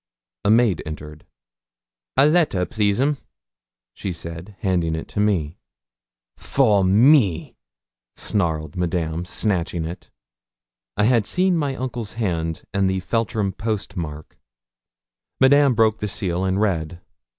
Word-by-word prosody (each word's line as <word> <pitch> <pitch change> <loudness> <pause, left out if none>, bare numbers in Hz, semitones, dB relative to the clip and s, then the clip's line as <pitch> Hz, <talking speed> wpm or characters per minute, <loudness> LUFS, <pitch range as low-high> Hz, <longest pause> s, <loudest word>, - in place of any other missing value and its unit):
A - - +1
maid 110 -5 +4
entered. 75 -1 -9 0.9
'A - - +6
letter, 150 - +2
please, 100 +2 0
'm,' 140 +1 +1 0.7
she 95 - -5
said, 85 +3 -8
handing 85 -4 0
it 80 - -5
to - - -4
me. 90 -7 0 0.8
'For 110 -8 +2
me,' 100 - +4 0.6
snarled 80 -7 -2
Madame, 85 -1 -2
snatching 90 -4 -1
it. 85 +2 -8 0.9
I 105 - +2
had 115 -2 +3
seen 185 0 +2
my 145 -4 -1
uncle's 125 -4 -4
hand, 85 -8 -2
and 100 -1 +2
the 95 0 -1
Feltram 110 +1 -1
post 105 -1 -4
mark. 75 -4 -7 1.0
Madame 140 -1 +5
broke 110 -1 +3
the 105 - -2
seal, 95 -2 -1
and 95 +1 0
read. 85 -5 -1
100 Hz, 125 wpm, -22 LUFS, 85-115 Hz, 1.0 s, A